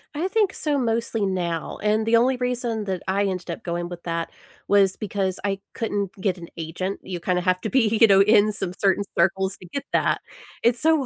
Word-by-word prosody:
I 325 +5 0
think 405 -1 +1
so 295 -2 -1
mostly 230 -3 0
now, 175 -4 -2
and 215 +1 +2
the 225 +1 +4
only 250 +2 +3
reason 240 -3 -2
that 190 -2 -3
I 195 +2 +1
ended 185 -2 -3
up 165 - -7
going 175 0 -3
with 175 -1 -8
that 165 -1 -3 0.4
was 195 -2 +4
because 195 -3 -2
I 195 -1 -1 0.2
couldn't 205 -4 -2
get 190 -1 0
an 170 -1 -10
agent. 170 +4 -4
You, 180 -2 -5
kinda 180 +1 0
have 185 0 +1
to 220 - -2
be, 225 -4 +2
you 225 - +9
know, 195 -1 +6
in 210 +1 +5
some 190 -3 -4
certain 200 0 +2
circles 190 +2 +2
to - - -13
get 275 +11 -5
that. - - +2 0.4
It's 235 0 +3
so 315 -3 +3
200 Hz, 210 wpm, -24 LUFS, 185-230 Hz, 0.4 s, you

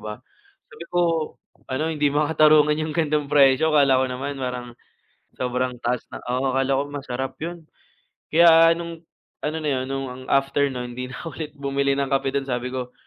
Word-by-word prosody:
ba? 105 0 -7 0.5
Sabi 170 - -10
ko 175 - +2 0.7
ano 135 +4 -1
"Hindi 150 -1 +1
makatarungan 150 0 +4
yung 155 -1 -3
gan'tong 150 -3 0
presyo" 135 +1 +5
akala 135 -3 +5
ko - - +2
naman 135 +2 -5
parang 125 -1 -4 0.7
sobrang 125 0 -1
taas 120 0 -1
na - - -7
oo 130 +1 0
akala 135 0 +1
ko - - +1
masarap 135 -2 -4
yun. 170 -1 -6 0.7
Kaya 165 0 +7
nung 170 -1 -7 0.4
ano 150 +1 -2
na 150 - -1
yun - - -4
nung 130 -1 -5
after 140 +1 +2
no'n 125 -1 -5
di 125 0 -5
nako 155 +5 -7
ulit 155 -2 -5
bumili 140 0 0
ng 140 - 0
kape 135 0 +1
dun 140 -1 -2
sabi 125 0 -2
ko, 125 -1 -5
140 Hz, 175 wpm, -23 LUFS, 130-150 Hz, 0.7 s, Kaya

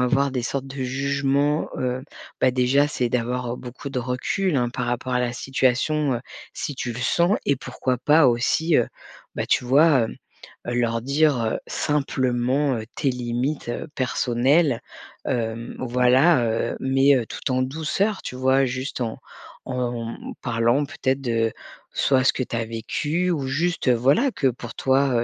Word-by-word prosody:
avoir 140 +2 +2
des 130 -2 -2
sortes 135 +2 -3
de 135 +1 -9
jugement, 140 +3 0
heu, 125 0 -2 0.4
beh, 130 - +4
déjà 130 +3 +3
c'est 125 -4 -1
d'avoir, 125 0 -1
heu, - - -8
beaucoup 125 +3 -8
de 135 -2 -3
recul, 130 +8 -1
hein, 120 -2 +1
par 125 +1 -3
rapport 125 +1 -2
à - - +3
la 120 -1 -1
situation, 135 +3 +1
heu, - - -5 0.3
si 145 - -4
tu 120 -2 -4
le 120 - -6
sens 170 +9 +2
et 140 - +3
pourquoi 130 -1 -2
pas 150 +3 +5
aussi, 150 +7 +2
heu, 120 - +3 0.5
ben, - - -2
tu - - +2
vois, 140 +1 +5
hem, 110 - -2 0.6
heu, 120 - -1
leur 115 -1 +1
dire, 140 +1 +2
heu, 110 - -1
simplement, 135 -1 0
heu, 110 - -4
tes 145 - 0
limites, 125 +3 -2
heu, 120 - -4
personnelles, 130 +2 +2 0.5
hem, 115 -2 -3
voilà, 125 +4 +4
heu, 115 0 -1
mais, 135 +1 +4
heu, 125 - 0
tout - - -5
en 130 0 +2
douceur 160 +9 -1
tu - - -6
vois? 130 +1 +3
Juste 130 +2 -4
en 115 -2 -3 0.5
en 120 -2 -2
mmh - - -8
parlant 120 +5 +2
peut-être 135 -1 -1
de 115 -3 +1 0.4
soit 130 -2 +2
ce - - +5
que - - -1
tu 120 - -6
as 115 - -1
vécu, 150 +10 -1
ou 145 -6 -1
juste, 165 +4 0
voilà, 135 - +3
que 140 -9 +1
pour 120 -1 -6
toi, 130 -2 +2
130 Hz, 175 wpm, -23 LUFS, 120-140 Hz, 0.6 s, pas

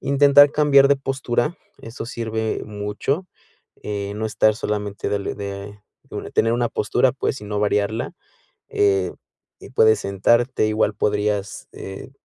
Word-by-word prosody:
intentar 140 +1 +6
cambiar 140 -2 +5
de 140 - +4
postura, 135 +2 -1 0.3
eso 115 0 -7
sirve 110 -3 -3
mucho, 105 - -3 0.6
eh, 100 -1 -4
no 110 - -3
estar 110 0 +2
solamente, 105 -3 -3
darle 100 -1 -2
de 100 0 -7 0.2
de - - -10
una - - -6
tener 115 +1 +2
una 120 0 0
postura, 125 +4 +1
pues, 135 0 -2
sino 105 -2 -4
variarla. 105 +2 0 0.6
Eh, 95 -3 +1 0.5
y - - -13
puedes 110 -4 +4
sentarte, 115 +5 +1
igual 110 -1 +1
podrías, 105 -1 -1
eh, 95 +6 -9
110 Hz, 135 wpm, -22 LUFS, 105-130 Hz, 0.6 s, intentar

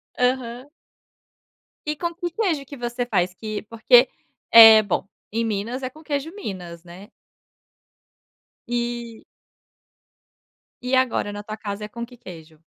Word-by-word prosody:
Aham. 250 +1 -1 1.2
E 305 - -1
com 340 +2 -3
que 350 0 -4
queijo 335 -9 -1
que 285 - -10
você 240 -1 -3
faz? 180 -5 0
Que 215 +2 -5
porque, 235 +3 +4 0.4
é 225 -1 +10
bom, 200 0 -2 0.2
em 230 +1 -1
Minas 225 +5 -3
é 255 - -2
com 310 +4 -17
queijo 300 +3 -3
minas, 180 - -7
né? 180 +5 -13 1.6
E. 240 -1 -4 1.6
E 255 +1 0
agora 250 -5 +1
na 205 - -6
tua 215 +1 -7
casa 205 0 -5
é - - -7
com 235 +2 -7
que 245 +1 -16
queijo? 165 -7 -13
235 Hz, 135 wpm, -23 LUFS, 205-260 Hz, 1.6 s, é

